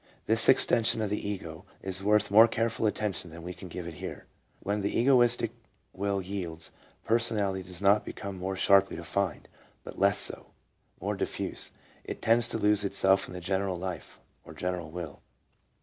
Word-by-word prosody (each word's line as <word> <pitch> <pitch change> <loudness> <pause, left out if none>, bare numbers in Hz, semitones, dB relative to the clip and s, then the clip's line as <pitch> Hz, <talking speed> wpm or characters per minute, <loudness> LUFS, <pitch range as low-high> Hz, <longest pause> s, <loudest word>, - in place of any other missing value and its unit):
This - - +6
extension 115 0 +4
of 105 - -2
the 105 -1 -2
ego 85 -4 -6 0.2
is 95 0 -1
worth 105 0 +2
more 110 +3 +8
careful 115 -1 0
attention 105 -4 -2
than 85 +1 -11
we 90 +1 -6
can 95 - -10
give 90 0 -7
it 85 - -6
here. - - -7 0.3
When 105 +1 -2
the 100 - -1
egoistic 120 -2 +3 0.4
will 100 0 -2
yields, 90 -4 -4 0.3
personality 105 -4 +1
does 90 +1 -7
not 100 +2 +5
become 100 -1 -7
more 95 +1 -3
sharply 95 +1 +4
defined, 85 +1 -3 0.4
but - - -10
less 100 +1 +4
so; - - -3 0.5
more - - -2
diffuse, - - -4 0.3
it - - -6
tends 115 +1 +3
to - - -1
lose 105 -1 +3
itself 95 -1 +2
in - - -9
the 90 - -6
general 95 +1 -1
life, 90 0 -6 0.2
or - - -12
general 90 -3 -3
will. 80 -3 -7
100 Hz, 170 wpm, -29 LUFS, 90-105 Hz, 0.5 s, more